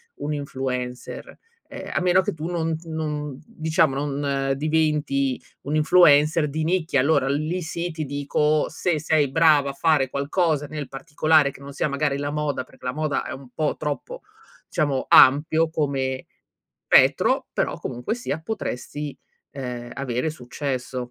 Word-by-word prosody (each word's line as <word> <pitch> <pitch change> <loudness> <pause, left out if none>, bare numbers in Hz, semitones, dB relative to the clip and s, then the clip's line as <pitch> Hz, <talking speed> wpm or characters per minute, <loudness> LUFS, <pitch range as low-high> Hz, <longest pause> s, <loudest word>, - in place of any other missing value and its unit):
un 150 +1 -4
influencer. 130 - -5 0.3
Ehm, - - -8
a - - +1
meno 180 +1 +4
che 205 +2 -3
tu 155 +1 -6
non 165 -2 -1
non 150 -3 -4
diciamo 155 -3 +1
non 140 -1 -1
diventi 150 -3 0 0.2
un 145 +2 -3
influencer 155 -1 +5
di 155 +2 -2
nicchia, 165 -5 +1
allora 140 -2 +2
lì 155 +6 -1
sì, 170 +2 -3
ti 155 -1 -4
dico, 145 +2 0
se 170 -4 -1
sei 150 -3 +1
bravo 150 -3 +4
a - - -5
fare 140 -3 +2
qualcosa 150 +1 0
nel 150 -2 -5
particolare, 150 +2 +2
che 140 - -15
non 140 0 -9
sia 150 - 0
magari 140 0 0
la 145 0 -2
moda, 150 -3 -2
perché 130 - -17
la 125 - -1
moda 155 -1 -1
è - - -6
un 135 -2 -11
po' 155 -1 0
troppo 155 - -4 0.5
diciamo 145 -4 0
ampio 155 +4 +6
come 135 -4 -1 0.6
spettro, - - +4
però - - -1
comunque 125 - -4
sia 240 -10 -4
potresti, 150 - -5 0.4
ehm, 125 -3 -6
avere 125 +1 -2
successo. 130 -2 -5
150 Hz, 150 wpm, -23 LUFS, 140-160 Hz, 0.6 s, ampio